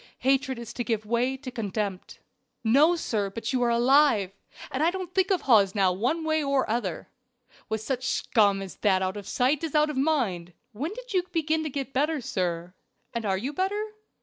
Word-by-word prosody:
Hatred 265 0 +1
is 235 -1 -8
to 240 - -3
give 225 -3 -2
way 240 +4 0
to 260 -1 -8
contempt." 205 -4 -4 0.5
"No, 285 +10 +5
sir, 215 -11 -1
but 225 +5 -4
you 255 - +1
are 240 - +3
alive, 240 -4 +4 0.4
and 265 - -2
I 325 - +4
don't 365 -1 -5
think 380 -1 +2
of 380 -3 +2
Hawes 205 -6 +4
now 190 -3 +3
one 250 - -1
way 315 -1 +1
or 275 -2 +1
other 215 -7 -3 0.6
with 220 -1 -2
such 255 +2 -2
scum 200 -6 +2
as 190 - -9
that 190 -3 +2
out 185 +1 -2
of 205 -2 -7
sight 265 +5 +1
is 315 -2 -3
out 300 0 +3
of 280 - -6
mind. 230 - 0 0.2
When 275 - -4
did - - -8
you 365 -2 +2
begin 320 -1 0
to - - -2
get 275 -1 -5
better, 300 +3 +1
sir? 180 -6 -3 0.4
and 230 -3 -2
are 190 -1 +1
you 260 +9 -4
better? 410 +6 -1
255 Hz, 200 wpm, -27 LUFS, 210-300 Hz, 0.6 s, No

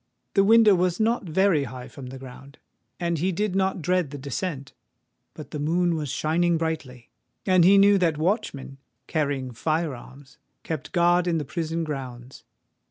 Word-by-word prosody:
The 195 - +4
window 220 0 +6
was 180 0 +1
not 220 -4 0
very 170 -4 +2
high 125 0 -8
from 135 -3 -10
the 130 +1 -8
ground; 135 +2 -12 0.4
and 170 -2 -1
he 185 +4 +1
did 195 +1 -2
not 190 -3 0
dread 180 -3 +1
the 145 - -7
descent:—but 140 - -8
the 150 - -5
moon 170 +4 +1
was 150 -3 -3
shining 165 +5 +1
brightly—and 160 - -2
he 195 +3 +6
knew 200 0 +6
that 165 -4 +1
watchmen, 155 - -2 0.3
carrying 140 -4 -2
fire 155 +5 -1
arms, 130 +1 -14 0.2
kept 155 -5 -5
guard 175 0 +3
in 170 -2 +1
the 150 - -3
prison 165 +2 -3
grounds. 130 -4 -7
160 Hz, 160 wpm, -25 LUFS, 140-180 Hz, 0.4 s, window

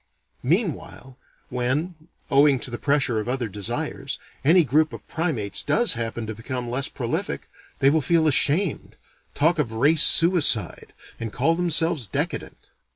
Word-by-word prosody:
Meanwhile, 155 - -3 0.3
when, 130 +8 -2 0.4
owing 140 0 +4
to 130 - -5
the 120 - -6
pressure 140 -6 +1
of 110 - -5
other 125 -2 -2
desires, 120 +7 -4 0.3
any 170 +5 +5
group 155 +2 +1
of - - -11
primates 150 - -2
does 235 0 +3
happen 115 -1 -4
to 110 - -5
become 120 +2 -6
less 130 +2 -1
prolific, - - -4 0.3
they 135 - +3
will 160 +1 +1
feel 160 +3 +2
ashamed, 150 +4 0 0.4
talk 160 +3 +1
of 125 -7 -1
race 145 +7 +3
suicide, 165 - +3 0.3
and 115 -2 -5
call 140 +9 +1
themselves 165 - +2
decadent. - - -4
140 Hz, 145 wpm, -23 LUFS, 120-160 Hz, 0.4 s, any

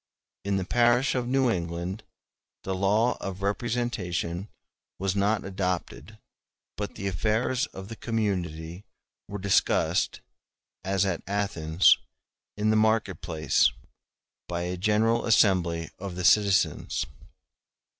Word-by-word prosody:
*e 100 - -5
In 100 - +2
the 95 - -2
parish 120 +4 +3
of 125 -2 -1
New 135 +1 +2
England 85 +2 -3 0.6
the 95 - -2
law 105 +6 +2
of 95 0 -5
representation 100 -5 -2 0.5
was 95 0 -1
not 100 +1 +1
adopted, 90 - -3 0.6
but 105 -1 -5
the 100 - -6
affairs 110 +7 0
of 95 0 -10
the 115 - -7
community 90 -7 -3 0.4
were 100 - -5
discussed, 100 0 +1 0.6
as 95 0 +1
at 90 -4 -1
Athens, 95 -4 +3 0.6
in 105 +1 +2
the - - +3
market 110 -5 +2
place, 80 -4 +2 0.8
by 85 0 -3
a 90 +1 -2
general 110 +5 +1
assembly 85 -7 +3
of 95 -1 -6
the 90 0 -3
citizens. 100 -7 +3
100 Hz, 120 wpm, -27 LUFS, 90-110 Hz, 0.8 s, parish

